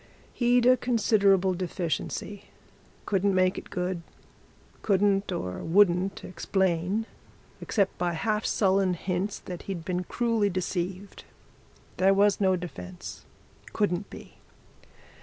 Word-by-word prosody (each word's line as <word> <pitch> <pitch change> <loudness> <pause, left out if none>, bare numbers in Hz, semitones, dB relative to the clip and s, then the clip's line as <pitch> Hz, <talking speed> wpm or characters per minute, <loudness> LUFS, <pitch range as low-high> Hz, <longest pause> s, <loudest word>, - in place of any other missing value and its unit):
He'd 245 0 +3
a 255 +1 +6
considerable 200 -6 +3
deficiency 180 +2 -4 0.6
couldn't 195 -1 +1
make 185 0 +2
it - - -14
good 180 -1 -2 0.8
couldn't 200 0 +2
or 90 0 -4
wouldn't 185 +1 +3
explain 185 +3 -1 0.6
except 200 -3 0
by 175 -1 0
half 210 +6 -1
sullen 190 -2 +2
hints 185 +3 -2
that 180 -2 -8
he'd 170 -4 -4
been 180 0 -2
cruelly 230 -2 +1
deceived. 185 +1 -4 0.7
There 195 +1 +4
was 205 +1 +3
no 190 -1 +4
defence 180 0 -8 0.5
couldn't 200 -2 -1
be. - - -12
190 Hz, 110 wpm, -27 LUFS, 180-205 Hz, 0.8 s, a